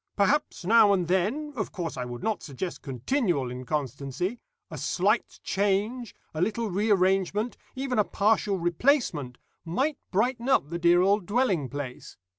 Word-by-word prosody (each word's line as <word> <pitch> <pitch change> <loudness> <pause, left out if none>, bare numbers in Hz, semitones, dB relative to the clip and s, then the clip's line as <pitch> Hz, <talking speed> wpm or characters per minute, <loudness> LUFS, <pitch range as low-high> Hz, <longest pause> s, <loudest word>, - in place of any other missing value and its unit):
Perhaps, 215 0 +1
now 210 0 +6
and 180 -3 0
then 220 - 0
of 215 - -3
course, 175 -5 -4
I 125 - -3
would 120 -1 -7
not 220 -2 -1
suggest 170 +5 -5
continual 140 - -1
inconstancy 140 - -3 0.3
a - - -6
slight - - 0
change, 205 +4 -1 0.2
a 155 - -3
little 220 +3 0
rearrangement, 195 +2 +1 0.2
even 260 -3 -1
a - - +6
partial 205 0 +1
replacement, 175 - +1 0.3
might 265 - -1
brighten 240 +5 0
up 170 - +2
the 170 - -3
dear 175 +1 +5
old 200 -1 +2
dwelling 200 - +1
place. 140 -2 -7
195 Hz, 145 wpm, -27 LUFS, 165-230 Hz, 0.3 s, now